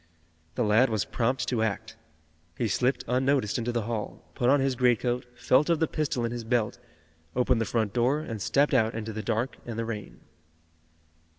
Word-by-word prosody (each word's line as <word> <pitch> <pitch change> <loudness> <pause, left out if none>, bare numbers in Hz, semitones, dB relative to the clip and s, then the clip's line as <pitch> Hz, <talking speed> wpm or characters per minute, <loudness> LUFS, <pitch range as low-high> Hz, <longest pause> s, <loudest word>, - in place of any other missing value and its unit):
The 125 - +1
lad 110 +4 +4
was 110 -3 0
prompt 120 0 -1
to 120 -3 0
act. 110 +1 -2 0.6
He 115 - 0
slipped 125 +6 +1
unnoticed 130 -2 +1
into 120 +1 -1
the 120 -2 -1
hall, 110 -2 -5
put 125 -2 +1
on 140 +1 +5
his 135 0 +1
greatcoat, 125 0 +1
felt 130 +5 +3
of 165 -2 +3
the 160 - +3
pistol 150 -6 -1
in 115 - -2
his 120 -1 -4
belt, 115 -2 0 0.6
opened 125 -1 +2
the - - +1
front 110 -3 -1
door 125 +5 +2
and 115 -9 -6
stepped 145 +8 +2
out 110 0 +3
into 110 -1 -4
the 110 - -4
dark 115 +3 -2
and 115 -2 -6
the 115 - -1
rain. 105 -3 -6
120 Hz, 190 wpm, -27 LUFS, 110-130 Hz, 0.6 s, on